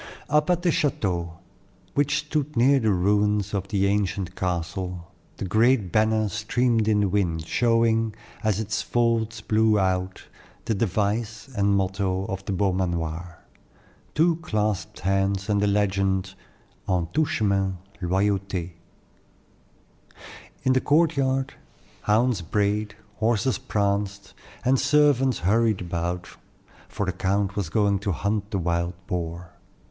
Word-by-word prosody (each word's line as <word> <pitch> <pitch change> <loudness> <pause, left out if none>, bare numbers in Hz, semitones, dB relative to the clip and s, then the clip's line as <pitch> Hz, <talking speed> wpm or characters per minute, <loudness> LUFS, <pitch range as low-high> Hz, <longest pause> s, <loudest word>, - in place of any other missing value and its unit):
Up 150 +2 +3
at 175 -1 +1
the 175 - +3
chateau, 90 - -1 0.6
which 145 0 +2
stood 150 -2 -2
near 135 +4 +5
the 110 -3 +1
ruins 105 +2 +1
of 100 -1 -2
the 100 -2 +1
ancient 100 -2 -1
castle, 90 0 -3 0.3
the - - -4
great 110 0 +2
banner 110 0 +2
streamed 110 +2 0
in 105 -1 +3
the 100 - +2
wind, 90 -5 0
showing, 115 0 +2 0.3
as 110 -2 +1
its 110 0 -2
folds 115 -2 0
blew 110 0 +3
out, 95 -1 -1 0.4
the 115 - 0
device 110 +4 -1
and 100 -1 +2
motto 95 0 -1
of 95 0 -5
the - - -3
Beaumanoir 90 -3 -2 0.7
two 165 +1 +3
clasped 110 - -2
hands 95 0 0
and 100 -1 +2
the 105 - +2
legend, 95 -2 +1 0.6
"En 90 -2 +1
tout 155 -1 +2
chemin 95 -5 0 0.2
loyauté." 95 -1 0 1.9
In 130 -1 +3
the 130 - +2
courtyard, 140 -4 +2 0.5
hounds 110 0 +2
brayed, 105 +3 -1 0.2
horses 115 +3 +1
pranced, 100 -4 -2 0.3
and 130 +1 +3
servants 140 -3 +3
hurried 110 0 +2
about; 85 0 -3 0.6
for 105 - -3
the 95 - -2
count 100 +2 0
was 100 -6 -2
going 100 0 +2
to 100 0 -2
hunt 100 +5 -2
the 100 - -1
wild 85 0 -1
boar. 85 -1 -4
100 Hz, 130 wpm, -25 LUFS, 95-115 Hz, 1.9 s, near